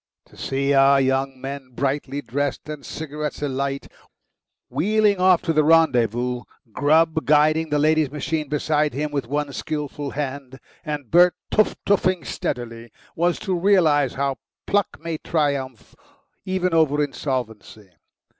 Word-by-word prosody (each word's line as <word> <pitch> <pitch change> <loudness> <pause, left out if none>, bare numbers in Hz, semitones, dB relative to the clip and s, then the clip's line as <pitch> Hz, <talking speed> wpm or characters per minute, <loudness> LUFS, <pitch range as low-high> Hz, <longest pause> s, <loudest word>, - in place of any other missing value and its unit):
To - - -21
see 140 +1 -1
our 135 0 +5
young 135 0 0
men, 135 -1 -7
brightly 140 +1 -2
dressed 145 +2 -3
and 150 -2 -7
cigarettes 150 -1 -5
alight, 140 0 -2 0.8
wheeling 210 +1 +2
off 185 -1 +4
to 165 - 0
the 155 -1 +3
rendezvous, 125 -6 +2 0.3
Grubb 160 +5 +2
guiding 155 +2 +3
the 150 - +1
lady's 155 0 +2
machine 150 +1 -3
beside 150 0 0
him 150 +1 -2
with 140 -5 -3
one 145 +1 -2
skilful 150 -2 -4
hand 135 -2 -5 0.2
and 150 -6 -5
Bert 175 +2 +6 0.2
teuf 215 - +2
teuffing 185 -3 +1
steadily, 115 -1 -5 0.2
was 175 +1 +1
to 195 -3 -2
realise 165 -8 +3
how 135 0 -1 0.3
pluck 205 -1 0
may 165 -1 -4
triumph 140 - -2 0.5
even 185 -2 0
over 150 -2 +3
insolvency. 115 -8 -5
145 Hz, 135 wpm, -22 LUFS, 135-160 Hz, 0.8 s, Bert